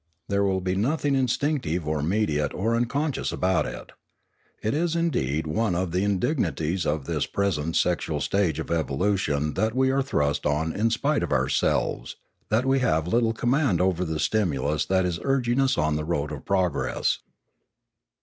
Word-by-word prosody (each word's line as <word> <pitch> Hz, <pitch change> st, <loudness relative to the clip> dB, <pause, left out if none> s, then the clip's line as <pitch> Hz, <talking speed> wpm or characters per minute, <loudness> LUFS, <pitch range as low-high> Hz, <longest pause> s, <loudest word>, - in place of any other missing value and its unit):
There 100 Hz, 0 st, +2 dB
will 95 Hz, -1 st, +1 dB
be 90 Hz, 0 st, -1 dB
nothing 140 Hz, +7 st, 0 dB
instinctive 130 Hz, -, 0 dB
or 75 Hz, -1 st, 0 dB
mediate 75 Hz, -4 st, 0 dB
or 115 Hz, +5 st, 0 dB
unconscious 140 Hz, +5 st, -1 dB
about 95 Hz, 0 st, +1 dB
it. -, -, -8 dB, 0.7 s
It 110 Hz, -, 0 dB
is 165 Hz, +2 st, 0 dB
indeed 80 Hz, -, 0 dB
one 90 Hz, +5 st, 0 dB
of 90 Hz, 0 st, -1 dB
the 90 Hz, +2 st, 0 dB
indignities 95 Hz, -, 0 dB
of 75 Hz, -2 st, -1 dB
this -, -, -1 dB
present 85 Hz, -6 st, -1 dB
sexual -, -, 0 dB
stage 100 Hz, -5 st, 0 dB
of 80 Hz, -, -5 dB
evolution 75 Hz, -1 st, 0 dB
that 110 Hz, +4 st, 0 dB
we 130 Hz, 0 st, +3 dB
are 135 Hz, +1 st, +2 dB
thrust 75 Hz, -, 0 dB
on 80 Hz, +2 st, 0 dB
in 110 Hz, +3 st, +1 dB
spite 140 Hz, +6 st, +1 dB
of -, -, -3 dB
ourselves, -, -, 0 dB, 0.3 s
that 115 Hz, +4 st, +2 dB
we 135 Hz, 0 st, +3 dB
have 80 Hz, -10 st, +1 dB
little 115 Hz, +4 st, +2 dB
command 120 Hz, -, +1 dB
over 90 Hz, -1 st, +1 dB
the 80 Hz, -3 st, -3 dB
stimulus 75 Hz, -7 st, 0 dB
that 95 Hz, -1 st, +2 dB
is 90 Hz, -1 st, -2 dB
urging 130 Hz, 0 st, +1 dB
us 135 Hz, 0 st, +2 dB
on 75 Hz, 0 st, +1 dB
the 75 Hz, -, -3 dB
road 75 Hz, -2 st, -2 dB
of 75 Hz, -2 st, -7 dB
progress. 95 Hz, -3 st, 0 dB
95 Hz, 170 wpm, -25 LUFS, 80-120 Hz, 0.7 s, we